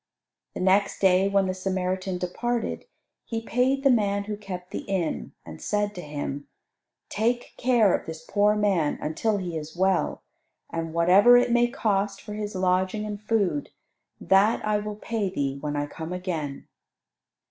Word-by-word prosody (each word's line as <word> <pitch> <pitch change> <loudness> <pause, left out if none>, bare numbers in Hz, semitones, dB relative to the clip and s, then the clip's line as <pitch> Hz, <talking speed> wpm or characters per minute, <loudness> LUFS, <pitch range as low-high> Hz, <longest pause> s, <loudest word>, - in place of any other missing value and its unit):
The - - -4
next 195 +2 +2
day, 190 0 +4
when 200 -1 +2
the 185 - -1
Samaritan 185 0 -2
departed, 230 +7 -2 0.4
he 225 - -3
paid 255 +4 +1
the 275 - +6
man 200 -4 +2
who 210 +1 -4
kept 185 -3 -8
the - - -3
inn, 190 -5 -3
and 80 -1 -10
said 205 0 -1
to 180 - -7
him, 145 -2 -5 0.6
"Take 240 +3 -1
care 240 -6 +3
of - - -2
this 160 0 -7
poor 205 +3 +3
man 195 -8 +1
until 205 +8 -1
he 180 -4 -4
is 155 +1 -6
well, 190 -1 +1 0.5
and 165 -1 -3
whatever 190 +8 +7
it 245 0 +2
may 240 0 +4
cost 205 -5 -1
for 210 - -8
his 210 -1 -4
lodging 185 +3 +1
and 210 -1 -5
food, 200 -9 0 0.5
that 200 +4 +3
I 210 -1 +1
will 210 0 -5
pay 215 -2 -2
thee 140 -6 -2
when 150 -1 -3
I 145 0 0
come 160 +3 -7
again." 165 -6 -4
195 Hz, 165 wpm, -26 LUFS, 180-210 Hz, 0.6 s, whatever